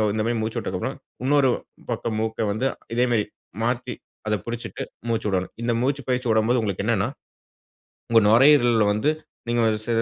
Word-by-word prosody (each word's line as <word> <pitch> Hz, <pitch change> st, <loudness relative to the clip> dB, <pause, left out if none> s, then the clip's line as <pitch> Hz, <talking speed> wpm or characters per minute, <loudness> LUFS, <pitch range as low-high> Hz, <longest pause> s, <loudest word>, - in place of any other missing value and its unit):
இந்த 110 Hz, -, 0 dB
மாரி 120 Hz, 0 st, 0 dB
மூச்சு 110 Hz, 0 st, -2 dB
விட்டதுக்கப்றம் -, -, -3 dB, 0.3 s
இன்னொரு 140 Hz, -1 st, +4 dB, 0.4 s
பக்கம் 110 Hz, -2 st, -2 dB
மூக்க 110 Hz, 0 st, -2 dB
வந்து 110 Hz, +6 st, -1 dB, 0.3 s
இதே 120 Hz, -, +3 dB
மாரி 110 Hz, -3 st, +2 dB, 0.4 s
மாத்தி, 125 Hz, +1 st, -1 dB, 0.3 s
அத 105 Hz, -, +1 dB
புடிச்சிட்டு 120 Hz, 0 st, -5 dB, 0.3 s
மூச்சு 115 Hz, -1 st, 0 dB
விடணும்.. 95 Hz, -1 st, -1 dB
இந்த 120 Hz, 0 st, +1 dB
மூச்சு 140 Hz, +3 st, 0 dB
பயிற்சி 125 Hz, 0 st, 0 dB
விடும்போது 110 Hz, +3 st, +3 dB
உங்களுக்கு 100 Hz, -2 st, -2 dB
என்னனா, 115 Hz, -1 st, +2 dB, 1.0 s
உங்க 115 Hz, -1 st, +6 dB
நுரையீரல்ல 120 Hz, -2 st, +6 dB
வந்து, 110 Hz, +8 st, +1 dB, 0.4 s
நீங்க 120 Hz, 0 st, +2 dB, 0.2 s
ச -, -, -18 dB
115 Hz, 155 wpm, -24 LUFS, 110-125 Hz, 1.0 s, உங்க